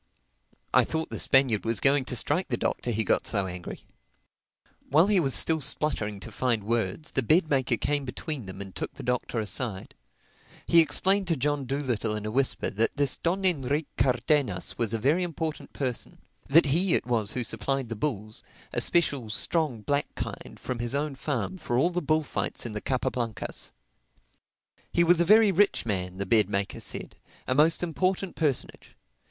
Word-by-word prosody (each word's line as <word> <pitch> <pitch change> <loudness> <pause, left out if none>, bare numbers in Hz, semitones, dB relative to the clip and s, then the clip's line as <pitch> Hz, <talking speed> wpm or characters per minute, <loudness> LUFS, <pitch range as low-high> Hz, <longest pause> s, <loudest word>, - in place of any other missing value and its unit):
I - - +6
thought 160 0 -3
the - - -4
Spaniard 135 -6 +3
was 115 -2 0
going 135 -1 +3
to 125 - -2
strike 150 +9 +1
the 120 - -1
Doctor 120 - -2
he 110 -1 +1
got - - +1
so 100 -3 0
angry. 90 -1 -7 1.0
While 155 +5 +5
he 205 -1 +3
was 135 -6 +1
still 160 -1 +3
spluttering 125 -7 0
to - - -8
find 120 -5 0
words, 115 +5 -2
the 135 - 0
bed 155 - +2
maker 130 -4 +2
came 145 +3 -1
between 130 -2 -5
them 95 - -7
and 95 -2 -8
took - - -5
the - - -9
Doctor 125 -1 -1
aside. 105 -1 -3 0.7
He 170 - +5
explained 190 +4 +3
to 165 - +2
John 145 0 -1
Dolittle 120 -5 -1
in 105 0 -5
a 110 - -3
whisper 135 +3 +1
that 110 +6 -1
this 140 -2 +1
Don 190 +3 -1
Enrique 145 -3 +1
Cardenas 125 - +1
was 115 -3 -1
a 115 - 0
very 140 +11 +2
important 160 -3 -4
person; 130 -4 -4 0.3
that 160 +4 +6
he 170 +6 +2
it - - 0
was 115 -4 -1
who 125 - -1
supplied 120 +4 -2
the 115 - -3
bulls—a 110 -4 -5
special, 140 -9 +1
strong 140 +1 +1
black 145 +5 0
kind—from 125 -2 -6
his 120 +2 0
own 145 0 -1
farm 140 - -3
for 120 -6 -1
all 170 +8 +3
the 180 0 -1
bullfights 155 -3 -1
in 115 - -5
the 105 - -4
Capa 130 -2 -1
Blancas. 115 -4 -4 1.2
He 170 - +3
was 170 0 +4
a - - +3
very 215 +2 +6
rich 200 -5 +2
man, 90 -4 -3
the 100 - -2
bed 105 0 +3
maker 100 0 -2
said, - - -5 0.3
a 130 - +1
most 155 +5 +3
important 185 +2 -1
personage. 145 -5 -2
135 Hz, 180 wpm, -27 LUFS, 115-155 Hz, 1.2 s, I